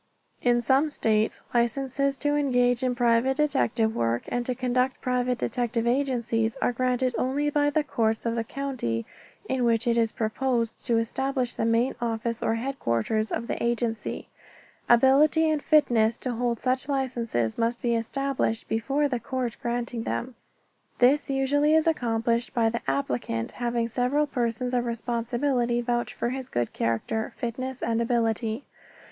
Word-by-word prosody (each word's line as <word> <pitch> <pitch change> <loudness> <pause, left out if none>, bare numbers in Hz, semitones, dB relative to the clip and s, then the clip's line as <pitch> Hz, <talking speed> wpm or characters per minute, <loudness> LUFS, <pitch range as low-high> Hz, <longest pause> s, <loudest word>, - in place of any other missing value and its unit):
In 240 -1 +2
some 270 +6 +3
states 220 -6 0
licenses 270 +3 +1
to 290 +1 0
engage 245 -4 +2
in 255 -1 0
private 240 +2 +2
detective 235 -7 +1
work 115 +1 0
and 245 - -1
to 255 - -1
conduct 255 +1 0
private 250 0 0
detective 240 -2 -1
agencies 235 -3 0
are 245 - +1
granted 255 +1 0
only 285 +3 0
by 290 0 +2
the 300 +1 +1
courts 225 -5 0
of 230 - 0
the 230 -1 -1
county 235 - -3 0.4
in 260 -1 0
which 230 0 +2
it 235 -1 +2
is 225 -1 +2
proposed 230 +1 -1
to 235 -2 +3
establish 255 +2 -1
the 225 - -1
main 230 +3 +2
office 230 0 -2
or 225 - +1
headquarters 220 - -1
of 230 - -2
the - - -4
agency. 235 -2 -2 0.6
Ability 280 +6 +5
and 310 -2 +1
fitness 235 -8 +3
to 255 - -3
hold 240 -1 -1
such 260 +2 -1
licenses 235 - -1
must 235 +1 0
be 240 -1 0
established 255 0 -1
before 275 +6 0
the 250 -4 -2
court 245 0 -3
granting 240 0 -2
them. 250 +2 -3 0.6
This 275 +4 +3
usually 290 +3 +2
is 320 - +4
accomplished 230 -7 0
by 230 -2 +3
the 235 +1 -3
applicant 125 -4 -1
having 235 -1 -1
several 250 +5 +1
persons 245 -2 -2
of 245 -1 +1
responsibility 240 +1 -1
vouch 240 0 -1
for 235 - -2
his 260 -1 -5
good 120 -1 -2
character, 115 - -1
fitness 255 +1 -4
and 230 0 +1
ability. 230 0 0
240 Hz, 155 wpm, -26 LUFS, 230-265 Hz, 0.6 s, Ability